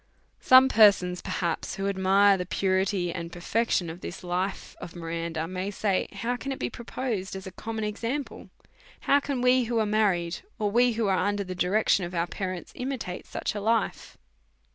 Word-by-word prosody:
Some 255 +1 +7
persons, 200 -7 +4
perhaps, 170 0 -2
who 195 0 -2
admire 195 +1 +4
the 180 -2 -4
purity 190 -2 0
and 170 -1 -6
perfection 180 +1 0
of 165 +2 -8
this 180 - -7
life 180 +2 -3
of 170 - -8
Miranda, 165 -1 -4
may 185 +2 -3
say, 200 -1 0
how 230 +5 -2
can 275 +2 -5
it 265 - -3
be - - -3
proposed 230 -5 -4
as 190 - -7
a 190 - -7
common 220 +4 -5
example! 230 +7 -4 0.5
How 280 - +4
can 280 -3 -3
we 250 0 +4
who 235 0 -1
are 220 - +2
married, 195 -5 +1 0.2
or 210 -3 -1
we 240 +2 +4
who 225 0 -1
are 190 -2 +2
under 205 0 0
the 185 -1 -6
direction 185 +2 +2
of 175 +1 -5
our 170 0 +1
parents, 185 0 -5
imitate 250 -8 -5
such - - -3
a 205 - -4
life 225 +1 -1
195 Hz, 185 wpm, -27 LUFS, 180-225 Hz, 0.5 s, Some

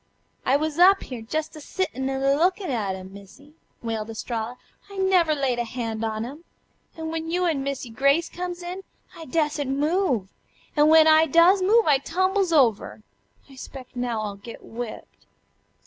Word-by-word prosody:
"I 270 - +4
wuz 310 +1 -3
up 385 +2 +6
here, 250 -3 -7
jest 310 +9 -4
a 305 - -9
sittin' 270 -6 -3
an' 270 0 -2
a 275 0 +4
lookin' 365 +2 +1
at 205 -6 -1
'em, 190 0 -10
Missy," 200 +10 -15 0.3
wailed 225 -1 -3
Estralla. 225 +1 -4 0.3
"I 400 - -10
never 365 -5 +3
layed 265 -4 0
hand 230 -2 -3
on 220 0 -2
'em. 290 +7 -10 0.5
An' 320 0 -4
when 325 0 -4
you 360 +2 0
an' 315 -5 0
Missy 270 -3 -4
Grace 275 +7 +2
comes 355 0 -6
in 360 +2 -6 0.3
I 325 - -9
da'sent 295 -1 -1
move. 295 - 0 0.5
An' 295 -1 +5
then - - +4
when 315 0 +7
I 315 +1 +6
does 340 +6 +5
move 440 +5 +4
I 285 -3 +4
tumbles 375 +5 0
over. 235 -8 +2 0.4
I 275 - -16
'spec' 260 -1 -10
now 245 -3 -2
I'll 205 -1 -5
get 230 +3 -11
whipped." 235 0 -9
285 Hz, 180 wpm, -24 LUFS, 240-335 Hz, 0.5 s, when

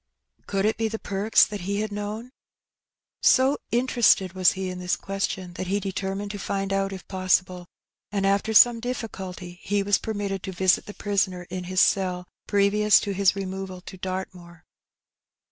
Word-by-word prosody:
Could 195 0 0
it 215 - +1
be 225 -1 0
the 220 0 -4
Perks 205 +1 +3
that 205 -2 -6
he 200 +3 -2
had 215 0 -3
known? 210 +4 -5 0.9
So 265 +2 +4
interested 235 -5 +3
was 185 -2 +4
he 190 0 -4
in 180 - -7
this 180 0 0
question 195 -2 -4
that 185 +2 -5
he 200 +2 0
determined 195 +1 -4
to 205 - -6
find 195 0 -2
out 195 0 0
if 190 -2 -9
possible; 185 -1 0 0.4
and, 200 -1 0
after 200 +2 +1
some 230 +2 +7
difficulty, 190 -7 -6
he 205 0 0
was 200 0 +2
per 220 -1 -4
mitted 195 -2 -3
to 190 - -5
visit 185 0 +2
the 205 - -9
prisoner 195 -3 -1
in 180 -1 -4
his 185 +1 +1
cell, 180 -2 +1 0.2
previous 205 +1 +4
to 200 - -3
his 195 0 +3
removal 190 -1 -5
to 190 - -10
Dartmoor. 185 -2 -7
195 Hz, 175 wpm, -25 LUFS, 185-205 Hz, 0.9 s, some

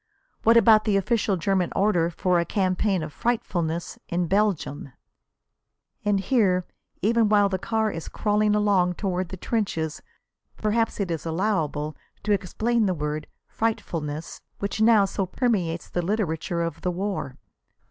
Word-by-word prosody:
"What 230 +1 +5
about 220 -1 +6
the 205 -3 +3
official 205 -1 +1
German 180 +1 0
order 185 -5 +2
for 180 +1 +1
a - - +2
campaign 190 -1 0
of 155 -1 -7
'frightfulness' 175 -8 -2
in 175 +1 0
Belgium?" 180 -8 0 1.1
And 205 -1 +2
here, 195 -5 +2 0.4
even 225 +1 +3
while 205 -1 +4
the 190 -1 -2
car 220 +1 0
is 165 - -6
crawling 210 0 +1
along 195 -4 +2
toward 185 -2 -2
the 190 - -7
trenches, 170 -8 -2 0.6
perhaps 220 +1 0
it 190 -4 -1
is 165 - -3
allowable 160 -4 -1 0.3
to 210 - -1
explain 215 +4 +1
the 185 - 0
word 150 0 -3 0.2
"frightfulness," 165 -8 -3 0.2
which 200 +2 -3
now 220 -2 +6
so 195 0 -2
permeates 185 -7 -1
the 175 - -2
literature 175 -3 -1
of 165 -2 -4
the 180 - 0
war. 180 -7 -3
190 Hz, 145 wpm, -25 LUFS, 170-215 Hz, 1.1 s, about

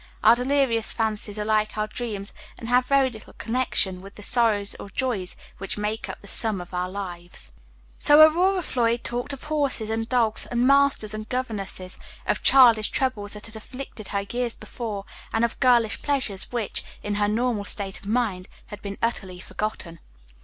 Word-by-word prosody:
Our - - +8
delirious 250 -3 +1
fancies 215 -2 -2
are 210 - -2
like 215 0 +1
our 215 - +1
dreams, 215 -3 -5 0.2
and 230 - -7
have 250 +1 +3
very 275 -2 +3
little 220 -2 -12
connection 225 -6 -1
with 195 +1 -12
the 205 - -10
sorrows 215 -4 +3
or - - -8
joys 205 -5 -2 0.2
which 195 +2 -3
make 210 +2 -3
up - - -6
the - - -12
sum 215 -1 +4
of 175 +1 -10
our 180 0 -1
lives. 180 -3 -5 0.5
So 295 +1 +6
Aurora 360 +4 +5
Floyd 235 -4 0
talked 245 +3 -2
of 275 - -4
horses 280 -8 -1
and 225 +1 -2
dogs, 230 -4 +1
and 240 0 +1
masters 275 -6 +3
and 215 0 -6
governesses; 200 -7 -4 0.3
of - - 0
childish 235 -5 +6
troubles 220 -6 -1
that 210 0 -6
had 225 - -5
afflicted 220 -1 -9
her 200 - -1
years 245 -1 -1
before, 210 -5 -6 0.3
and 225 +1 +2
of 235 - -5
girlish 240 -4 +3
pleasures, 255 -9 -1
which, 235 -4 -2 0.2
in 205 - -2
her 205 - +3
normal 220 -1 0
state 195 -2 -1
of - - -13
mind, 210 -5 0 0.2
had 210 -1 -9
been 200 -1 -6
utterly 190 -6 -2
forgotten. 185 -4 -5
220 Hz, 180 wpm, -25 LUFS, 205-250 Hz, 0.5 s, Our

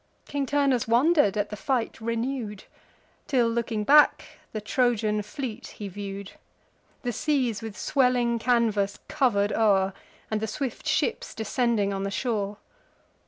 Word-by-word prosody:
King 280 -2 -2
Turnus 275 -4 +2
wonder'd 240 - +4
at 205 0 -1
the - - -3
fight 230 +3 -2
renew'd, 230 -2 -3 0.6
Till, 250 -4 +3
looking 230 -2 -1
back, 295 +6 +5 0.3
the 215 - -3
Trojan 215 -1 +1
fleet 215 +2 -6
he 205 - -5
view'd, 200 0 -6 0.7
The 245 -1 -1
seas 250 -4 0
with 220 -3 -7
swelling 250 -2 +2
canvas 220 -4 +1
cover'd 220 -9 +1
o'er, 195 -3 +3 0.4
And 215 0 0
the 220 - -1
swift 255 +2 -4
ships 455 - 0
descending 220 -2 0
on 195 - -3
the 195 - -2
shore. 205 -2 -2
225 Hz, 135 wpm, -26 LUFS, 205-255 Hz, 0.7 s, back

